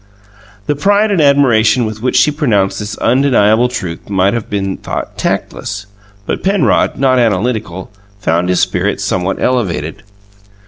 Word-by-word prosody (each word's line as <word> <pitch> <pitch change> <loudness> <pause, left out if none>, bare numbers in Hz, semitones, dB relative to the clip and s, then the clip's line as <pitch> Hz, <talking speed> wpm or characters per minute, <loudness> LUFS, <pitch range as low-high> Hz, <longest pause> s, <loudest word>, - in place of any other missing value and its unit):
The 145 - 0
pride 205 +7 +2
and 185 -5 +2
admiration 130 -5 +3
with 110 0 -6
which 125 +1 -1
she 150 - +4
pronounced 105 -11 0
this 105 0 -5
undeniable 120 -2 +3
truth 90 -10 -6
might 95 0 +2
have 115 -2 -4
been 95 -2 -2
thought - - -6
tactless, 100 +1 -3 0.4
but - - -3
Penrod, 195 +1 +1
not 130 -2 +2
analytical, 105 -5 -1 0.3
found 90 -2 0
his 90 - +2
spirits - - 0
somewhat 95 +1 -1
elevated. 120 -9 -1
110 Hz, 140 wpm, -14 LUFS, 95-130 Hz, 0.4 s, she